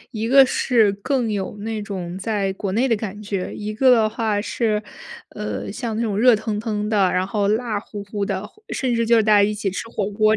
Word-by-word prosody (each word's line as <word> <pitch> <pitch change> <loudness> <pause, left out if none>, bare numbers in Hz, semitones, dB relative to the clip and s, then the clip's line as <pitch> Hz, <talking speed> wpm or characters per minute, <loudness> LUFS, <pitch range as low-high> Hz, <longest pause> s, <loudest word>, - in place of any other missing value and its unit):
一 225 -2 -3
个 270 +2 +8
是 230 -5 +2
更 230 +3 -1
有 200 0 -3
那 220 0 -3
种 185 -3 -5
在 200 -2 -1
国 195 0 -4
内 235 +6 +2
的 235 - +2
感 210 -1 -5
觉， 200 -3 -4
一 210 0 -5
个 235 -1 +4
话 220 -2 -1
是， 215 -2 -1 0.5
呃， 105 -1 -5
像 225 -3 -4
那 230 - -1
种 210 -3 -1
热 240 -1 +6
腾 215 -1 -3
腾 210 -2 -2
的， 200 -4 +3
然 185 +1 0
后 200 -1 0
辣 215 -1 0
乎 205 -1 -8
乎 205 0 -5
的， 195 0 -3
或 430 - -23
甚 255 -3 -1
至 230 -1 +1
就 235 - +5
是 225 - +4
大 215 0 +3
家 205 -1 +6
一 210 +1 +1
起 205 -2 -2
吃 195 +4 -5
火 210 -3 -3
锅 215 +1 +3
210 Hz, 250 characters per minute, -22 LUFS, 200-225 Hz, 0.5 s, 个